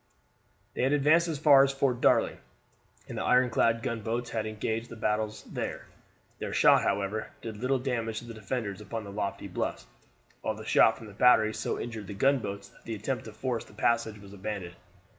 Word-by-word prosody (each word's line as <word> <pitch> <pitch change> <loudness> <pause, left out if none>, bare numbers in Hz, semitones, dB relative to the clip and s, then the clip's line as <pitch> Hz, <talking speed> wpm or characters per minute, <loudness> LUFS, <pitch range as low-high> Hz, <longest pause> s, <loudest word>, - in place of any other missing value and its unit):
They - - -3
had 130 +3 +3
advanced 155 +4 +4
as 160 -3 -2
far 140 -2 +7
as 135 - +2
Fort 135 -3 0
Darling - - +3 0.7
and - - -5
the - - -2
ironclad 115 -2 +3
gunboats 115 0 -2
had 110 -1 -2
engaged 110 +2 -3
the - - -8
batteries 110 0 -1
there. - - -5 0.5
Their - - -4
shot, - - +6
however, 100 +2 -1
did 110 -2 -6
little 130 +4 +1
damage 120 -4 -2
to 120 - -5
the 115 - -8
defenders 105 -2 -4
upon 110 +2 -5
the 100 - -8
lofty 100 -1 -3
bluffs, - - -3 0.6
while 110 - -2
the 110 0 -9
shot 110 0 +5
from 115 - -11
the 105 - -11
batteries 110 -1 +4
so - - -2
injured 110 -4 -6
the 100 - -6
gunboats 105 -4 0
that - - -23
the 115 - -4
attempt 120 +5 -3
to 110 - -8
force 115 +1 -3
the - - -18
passage 110 0 +1
was 100 -1 -13
abandoned. 95 -3 -5
115 Hz, 195 wpm, -29 LUFS, 105-125 Hz, 0.7 s, far